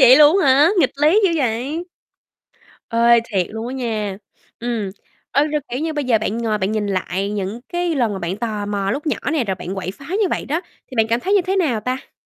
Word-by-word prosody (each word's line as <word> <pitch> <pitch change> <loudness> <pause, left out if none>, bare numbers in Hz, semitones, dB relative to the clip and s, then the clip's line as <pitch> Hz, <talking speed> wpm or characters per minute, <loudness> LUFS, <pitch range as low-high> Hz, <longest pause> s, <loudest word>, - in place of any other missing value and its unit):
vậy 260 0 +9
luôn 305 +5 +7
á 320 - +2
hả? 285 +4 +6
Nghịch 270 - +3
lý 310 +9 +4
dữ 380 - +4
vậy. 270 +5 -1 1.0
Ê, 235 0 +5
thiệt 185 -4 +1
luôn 220 +1 -5
á - - -5
nha, 215 -6 -2 0.4
ừm. 230 -4 -2 0.4
Ơ, 285 - +3
rồi, 300 0 -1
kiểu 250 +3 -3
như, 320 0 -1
bây 295 -2 -2
giờ 240 -3 +3
bạn 215 +1 -2
ngồi 220 -2 0
bạn 195 +1 -1
nhìn 215 -1 -1
lại 195 0 -2
những 205 +2 -3
cái 350 -1 -1
lần 240 -7 +1
mà 195 - -4
bạn 180 +1 -3
tò 215 -2 -3
mò 200 -1 -1
lúc 295 +8 -3
nhỏ 300 - 0
nè 300 -6 +1
rồi 195 -3 -1
bạn 185 +1 -6
quậy 190 -1 -4
phá 205 - -13
như 400 +1 +1
vậy - - -1
đó. 310 +5 -1 0.3
Thì - - -8
bạn 225 -1 +4
cảm 230 +1 +1
thấy 390 +9 +1
như 405 - +5
thế 375 +2 -1
nào 290 - +1
ta? 255 +4 -4
235 Hz, 245 wpm, -20 LUFS, 210-295 Hz, 1.0 s, vậy